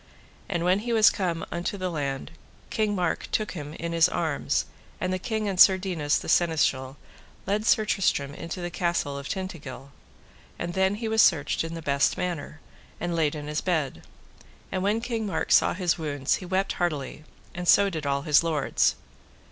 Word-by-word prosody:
And 175 -3 -1
when 185 +2 +3
he 235 +2 -3
was 220 -2 +6
come 175 -5 -2
unto 175 +4 -3
the 185 -1 -3
land, 140 -4 -3 0.4
King 215 -2 0
Mark 180 -3 -1
took 215 - 0
him 150 -3 -7
in 170 0 -4
his 165 -1 +5
arms, - - -1 0.3
and 185 0 -1
the 185 - -1
king 220 0 -2
and 190 -2 -2
Sir 190 0 +8
Dinas, 170 -6 0
the - - -6
seneschal, 140 -5 +1 0.5
led 210 +3 -1
Sir 215 - +4
Tristram 145 -9 0
into 170 +4 -6
the 175 0 -4
castle 170 -6 -1
of 140 0 -6
Tintagil. 150 -8 -6 0.7
And 175 0 -4
then 190 +1 +2
was 210 - -7
he 220 -1 -1
searched 160 -8 +3
in 165 0 -5
the 165 - -7
best 140 -1 +2
manner, 170 -4 -4 0.4
and 175 -1 -2
laid 155 -2 +1
in 150 -1 -6
his 150 +1 -2
bed. 150 - -1 0.7
And 185 - -1
when 210 +4 +1
King 230 -3 -2
Mark 195 - -2
saw - - +5
his 180 -2 0
wounds 145 -3 0
he 180 - -9
wept 190 +2 0
heartily, 150 -3 -2 0.3
and 175 0 -5
so 200 +2 +6
did 155 -4 -4
all 140 0 0
his 150 -2 +5
lords. 155 -4 +1
175 Hz, 190 wpm, -26 LUFS, 150-190 Hz, 0.7 s, Sir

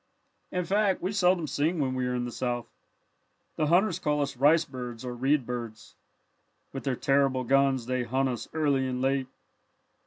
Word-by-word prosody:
"In 180 -1 -1
fact 200 -1 +1
we 185 - 0
seldom 180 -4 +2
sing 150 +5 0
when 130 -3 0
we 130 -1 -1
are 125 - -1
in 120 0 -1
the 120 - -5
South. 120 -1 -2 0.9
The 155 - 0
hunters 180 +2 +3
call 150 -4 0
us 140 -1 -4
'rice 150 +6 +4
birds' 125 -3 -7
or 125 - -4
'reed 135 +2 +1
birds.' 115 -3 -6 0.8
With 135 - -6
their 135 -2 0
terrible 135 -1 +2
guns 135 -1 +2
they 130 +1 -1
hunt 130 +3 0
us 125 -2 -4
early 140 -4 +1
and 125 -1 -3
late. 135 0 0
135 Hz, 180 wpm, -28 LUFS, 125-155 Hz, 0.9 s, rice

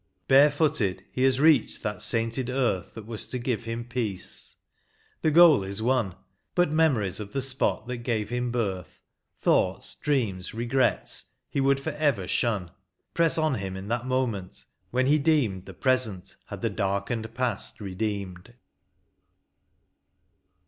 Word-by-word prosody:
Barefooted 140 - +3
he 130 - -3
hath 130 -1 +3
reached 150 -4 +3
that 105 0 -3
sainted 115 +4 0
earth 125 -9 -1
That 110 -2 -8
was 110 -1 -3
to 125 - -3
give 120 -2 -2
him 115 +1 -4
peace, 115 -6 -4 0.3
— - - -38
the 155 - +3
goal 155 - +7
is 100 +2 -4
won; 115 -5 0 0.4
But 175 -3 +3
memories 135 - +2
of 105 -1 -7
the 140 - 0
spot 130 -4 +2
that 125 0 -4
gave 115 -3 -2
him 125 0 -1
birth, 95 -8 -3 0.4
Thoughts, - - +1
dreams, 110 -11 -2
regrets, 120 +3 0 0.2
he 140 - 0
would 135 0 +3
forever 145 - -1
shun. 100 -8 0 0.4
Press 165 -1 +2
on 155 -2 +2
him 95 -5 -4
in 95 +2 -7
that 120 +2 -2
moment, 120 -8 -2 0.2
when 130 +1 +1
he 150 +3 +4
deemed 140 - +1
The - - -10
present 125 -8 -1
had - - -8
the 115 -2 0
darkened 105 +3 -2
past 125 -4 -2
redeemed. 100 0 -4
120 Hz, 145 wpm, -26 LUFS, 100-135 Hz, 0.4 s, goal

